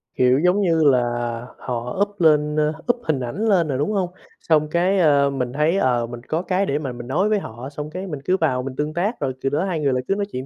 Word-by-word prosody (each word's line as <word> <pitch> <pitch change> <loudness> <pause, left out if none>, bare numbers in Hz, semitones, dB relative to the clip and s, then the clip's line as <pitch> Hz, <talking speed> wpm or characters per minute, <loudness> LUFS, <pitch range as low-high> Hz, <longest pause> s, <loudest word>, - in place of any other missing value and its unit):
Kiểu, 125 +1 +4
giống 180 +5 +3
như 165 -4 +2
là 135 -4 +5 0.6
họ 125 +3 -4
up 205 0 0
lên 150 -1 +4 0.4
up 240 - -17
hình 155 -8 0
ảnh 130 - -3
lên 180 -6 +3
rồi, 135 -3 -1
đúng 145 +9 0
hông? 190 -4 0 0.3
Xong 155 -2 +2
cái, 180 +4 +2
ơ, 145 -4 +4
mình 125 -3 -3
thấy, 155 +6 +2
ờ, 125 -8 +2
mình 120 0 -8
có 160 +2 -1
cái 185 +2 0
để 145 -4 -1
mà 140 -4 -4
mình 120 0 -8
nói 180 +11 +1
với 215 -1 +2
họ 120 - -8
xong 150 +1 -6
cái 185 +4 -6
mình 150 -6 -5
cứ 185 +1 +2
vào 130 -7 0
mình 130 0 -6
tương 150 +3 -2
tác 200 +8 -1
rồi 130 -2 -1
từ 135 - 0
đó 150 +6 0
hai 180 -4 -2
người 140 -3 +1
lại 125 0 -1
cứ 195 - +1
nói 200 0 -1
chuyện 130 +1 -5
150 Hz, 265 wpm, -22 LUFS, 130-180 Hz, 0.6 s, là